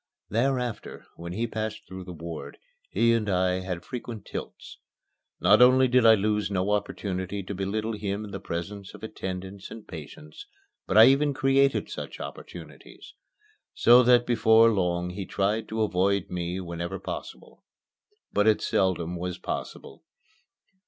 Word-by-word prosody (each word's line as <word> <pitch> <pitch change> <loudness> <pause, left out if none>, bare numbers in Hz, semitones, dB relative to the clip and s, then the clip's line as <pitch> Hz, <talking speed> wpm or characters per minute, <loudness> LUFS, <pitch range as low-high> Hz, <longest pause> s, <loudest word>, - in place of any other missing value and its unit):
Thereafter, 125 0 -2
when 85 +1 -7
he 115 +5 -1
passed 110 -1 -5
through 95 0 -9
the 90 - -8
ward, 85 -1 -8 0.3
he 115 0 +3
and 110 -3 0
I 90 -1 +1
had 90 -2 -5
frequent 120 -4 -7
tilts. - - -8 0.6
Not - - +5
only 130 +1 +6
did 125 -2 +4
I 110 - +8
lose 105 0 0
no 95 0 0
opportunity 100 -1 -2
to 95 - -6
belittle 105 +4 -2
him 105 0 -3
in 100 - -10
the 100 - -5
presence 95 +3 -6
of - - -14
attendants 95 -2 -6
and 115 - -11
patients, 150 - -10 0.4
but - - +1
I 110 - +11
even 140 +2 +3
created 135 0 +2
such - - -7
opportunities; - - -10 0.6
so 120 +1 +7
that 120 0 +5
before 115 -1 +5
long 90 -2 -1
he 95 +1 -6
tried 105 +3 -1
to 110 0 -1
avoid 100 0 0
me 90 +1 -3
whenever 85 -1 -5
possible. - - -8 0.7
But 105 +1 +2
it 110 - +4
seldom 90 -2 0
was 90 +1 -4
possible. - - -7
100 Hz, 150 wpm, -26 LUFS, 90-115 Hz, 0.7 s, I